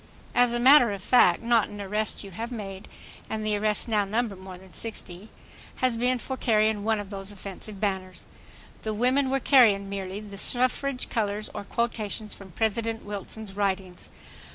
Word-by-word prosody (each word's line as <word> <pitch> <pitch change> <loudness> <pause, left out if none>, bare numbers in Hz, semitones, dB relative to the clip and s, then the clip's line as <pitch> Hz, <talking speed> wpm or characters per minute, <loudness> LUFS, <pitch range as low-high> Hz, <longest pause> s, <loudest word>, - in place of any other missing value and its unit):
As 245 -1 +4
a 240 - 0
matter 260 -2 +7
of 195 -1 -7
fact 250 -2 +5
not 230 -2 +3
an 205 -1 -9
arrest 210 +3 -2
you 195 - -9
have 230 +6 -5
made—and 215 0 -7
the 215 -1 +1
arrests 210 +2 +1
now 215 -3 +2
number 215 +1 -1
more 185 -1 -10
than 185 0 -16
sixty—has 225 +4 -5
been 250 +2 +2
for 265 +2 -5
carrying 215 -4 +2
one 220 0 +1
of 205 0 -7
those 195 0 -3
"offensive" 200 +1 -8
banners. 190 -3 -3 0.6
The 215 -1 -3
women 260 +4 +2
were 270 +1 +1
carrying 215 -8 +5
merely 195 0 -4
the 205 -2 -8
suffrage 255 +3 +1
colors 210 -2 -2
or - - -5
quotations 220 -2 -2
from 195 -1 -11
President 225 +2 -1
Wilson's 205 0 -6
writings. 190 -2 -2
215 Hz, 165 wpm, -26 LUFS, 195-235 Hz, 0.6 s, matter